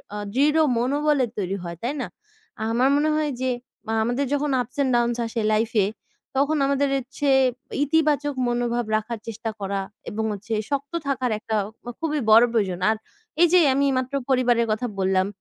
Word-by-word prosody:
আ - - -3 0.2
দৃঢ় 295 +5 +3 0.2
মনোবলের 280 +1 +1
তৈরি 195 -1 -2
হয়। 170 -1 -6
তাই 250 +4 -1
না? - - -3 0.6
আমার 250 +3 +3
মনে 300 +2 +2
হয় 305 -1 0
যে 260 - +1 0.4
আ - - 0
আমাদের 245 +5 0
যখন 290 0 0
Ups 250 +3 -9
and 260 - +1
downs 240 0 +1
আসে 225 0 -3
লাইফে 220 -1 +2 0.5
তখন 285 +3 +2
আমাদের 280 0 +1
হচ্ছে 275 +2 -3 0.5
ইতিবাচক 295 -1 +2
মনোভাব 240 0 0
রাখার 220 +1 -2
চেষ্টা 225 0 -4
করা 195 0 -2 0.3
এবং 220 -1 -3
হচ্ছে 205 +3 -6 0.2
শক্ত 280 +2 -3
থাকার 260 -3 0
একটা 220 0 -3 0.4
খুবই 305 -2 -1
বড়ো 225 +3 +8
প্রয়োজন 190 -6 0
আর 220 - +1 0.4
এই 345 - +8
যে 365 - +8
আমি 280 +1 +2
মাত্র 260 +1 -2 0.2
পরিবারের 245 -3 +3
কথা 220 +3 -1
বললাম, 190 0 +2
245 Hz, 165 wpm, -24 LUFS, 220-280 Hz, 0.6 s, বড়ো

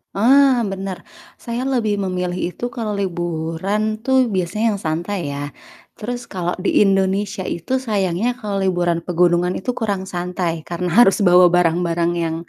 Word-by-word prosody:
Ah, 255 +2 +5
bener, 195 -2 -5 0.3
saya 245 +2 -4
lebih 220 -6 0
memilih 180 -2 -2
itu 245 0 -4
kalo 220 -3 -3
liburan 185 +4 -2
tuh 260 -1 +2
biasanya 195 +5 0
yang 200 - -6
santai 170 +5 -2
ya. 145 0 -5 0.5
Terus 240 +2 -4
kalau 180 -2 -3
di - - +2
Indonesia 195 0 0
itu 170 +10 -2
sayangnya 205 0 0
kalau 205 -3 -3
liburan 175 -2 +1
pegunungan 175 0 +2
itu 245 +6 -3
kurang 200 -4 -2
santai, 175 -2 -3
karena 175 +1 -4 0.2
harus 195 - +3
bawa 180 -2 +6
barang-barang 170 -1 +1
yang 165 -1 -1
190 Hz, 145 wpm, -20 LUFS, 175-215 Hz, 0.5 s, bawa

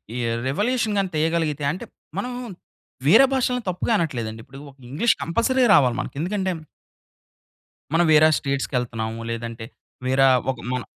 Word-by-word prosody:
ఈ - - -3 0.3
రివల్యూషన్ 215 - 0
గాని 195 -2 +1
తీయగలిగితే 155 -2 0
అంటే 180 - -6 0.3
మనము 245 +5 -3 0.7
వేరే 225 - +8
భాషల్ని 250 -1 0
తప్పుగా 180 +6 -2
అనట్లేదండి. 115 - -3
ఇప్పుడు 135 +1 -13
ఒక 135 - -26
ఇంగ్లీష్ 195 - +2
కంపల్సరీ 240 +9 +1
రావాలి 125 -4 +4
మనకి. - - -5
ఎందుకంటే 190 +3 -1 1.4
మనం 170 +1 +4
వేరే 155 0 +7
స్టేట్స్‌కి 140 -1 -2
ఎళ్తున్నాము. 115 -2 -4
లేదంటే 115 -1 -5 0.4
వేర 130 +1 +2 0.3
ఒక 130 - -9 0.2
మనం 125 - -3
155 Hz, 135 wpm, -23 LUFS, 130-205 Hz, 1.4 s, వేరే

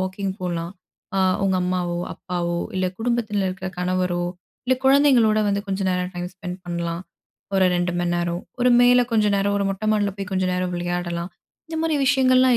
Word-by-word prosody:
Walking 190 +1 -2
போலாம். 175 -1 -3 0.4
அ - - +2 0.3
உங்க 190 -1 +2
அம்மாவோ, 180 -1 -1 0.2
அப்பாவோ 175 -1 -3 0.2
இல்ல 185 0 +1
குடும்பத்தில 225 -4 0
இருக்குற 190 0 -4
கணவரோ, 180 -1 0 0.4
இல்ல 260 - +4
குழந்தைங்களோட 265 -6 +5
வந்து 200 0 +1
கொஞ்ச 195 0 -2
நேரம் 180 0 -1
டைம் 175 0 -3
ஸ்பெண்ட் 180 -1 -6
பண்ணலாம். 170 -1 -3 0.5
ஒரு 190 -1 +4
2 175 0 0
மணி 175 0 0
நேரம் 175 0 -2 0.2
ஒரு 250 - +4
மேல 245 0 +6
கொஞ்ச 215 -2 +3
நேரம், 200 +1 +1
ஒரு 200 - 0
மொட்ட 195 +2 -5
மாடில 205 -2 +1
போய் 200 0 -5
கொஞ்ச 185 0 +1
நேரம் 180 0 -1
விளையாடலாம். 175 0 -3 0.4
இந்த 325 0 -5
மாரி 320 -2 +1
விஷயங்கள்லாம் 255 -1 +5
185 Hz, 170 wpm, -23 LUFS, 175-215 Hz, 0.5 s, மேல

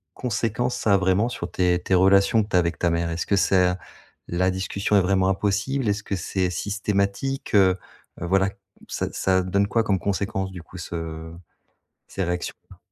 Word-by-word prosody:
conséquences 120 0 -1
ça 105 -4 +2
a - - +5
vraiment 95 +5 +2
sur - - -6
tes 90 -1 +2
tes 95 - -2
relations 100 +4 +5
que - - -9
tu - - -1
as - - +6
avec 85 -1 -1
ta 85 - +2
mère? 85 0 0
Est-ce 85 0 -2
que 100 - +3
c'est 90 -1 +4
a 90 0 -1 0.5
la 90 +2 +1
discussion 100 +2 -1
est - - +5
vraiment 95 0 +2
impossible? 105 +6 0
Est-ce 100 0 -1
que 100 - -2
c'est 95 0 -1
systématique, 105 +6 -1
heu? 95 -2 +5 0.4
Heu, - - -2
voilà, 95 +1 +2 0.4
ça - - -2
ça 95 -1 +2
donne 100 +2 +1
quoi 115 +1 +1
comme 95 -3 +1
conséquence, 95 -1 -2
du 90 -2 -8
coup, 90 - -12
ce 80 -1 -6 0.7
ces 95 - -3
réactions 90 0 -3 0.2
là? - - -14
95 Hz, 195 wpm, -24 LUFS, 90-100 Hz, 0.7 s, as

